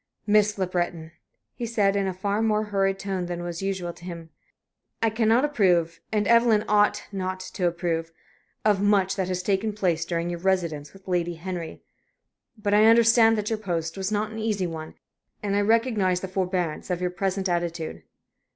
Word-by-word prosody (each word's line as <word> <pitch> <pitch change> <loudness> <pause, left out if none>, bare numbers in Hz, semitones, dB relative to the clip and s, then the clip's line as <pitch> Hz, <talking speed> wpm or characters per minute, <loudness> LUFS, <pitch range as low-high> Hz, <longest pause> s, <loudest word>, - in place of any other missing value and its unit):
"Miss 210 0 +3
Le 190 - +1
Breton," 175 -3 -3 0.4
he 235 - -4
said, 205 -3 +2
in 200 -1 +1
a - - 0
far 200 +3 -1
more 215 -1 +2
hurried 195 -2 0
tone 195 -2 -3
than 175 0 -4
was 175 0 -5
usual 190 -3 -2
to 175 - -17
him, 170 -2 -8 0.7
"I 225 -1 +2
cannot 225 +4 +3
approve 180 - +2
and 210 -2 +1
Evelyn 230 -2 +4
ought 210 0 +3
not 185 -1 -3
to 185 -1 -2
approve 170 -1 -2 0.5
of 205 -2 +3
much 200 -2 +3
that 190 -2 -1
has 180 -1 -2
taken 200 +2 0
place 175 -5 0
during 170 0 -2
your 175 - -4
residence 170 -6 -1
with 195 0 -18
Lady 175 -1 0
Henry. 175 -1 -6 0.7
But 205 -1 -1
I 210 +1 +6
understand 230 0 +6
that 210 +1 -2
your 220 - -1
post 170 -5 -3
was 195 +1 -3
not 215 +1 -1
an 220 - -6
easy 215 -4 -1
one, 160 -2 -6 0.5
and 200 -1 0
I 205 - +3
recognize 210 -4 +2
the 190 - -4
forbearance 185 -3 -2
of 180 -1 -1
your 180 0 -1
present 190 +1 -1
attitude. 170 - -2
190 Hz, 185 wpm, -25 LUFS, 175-210 Hz, 0.7 s, I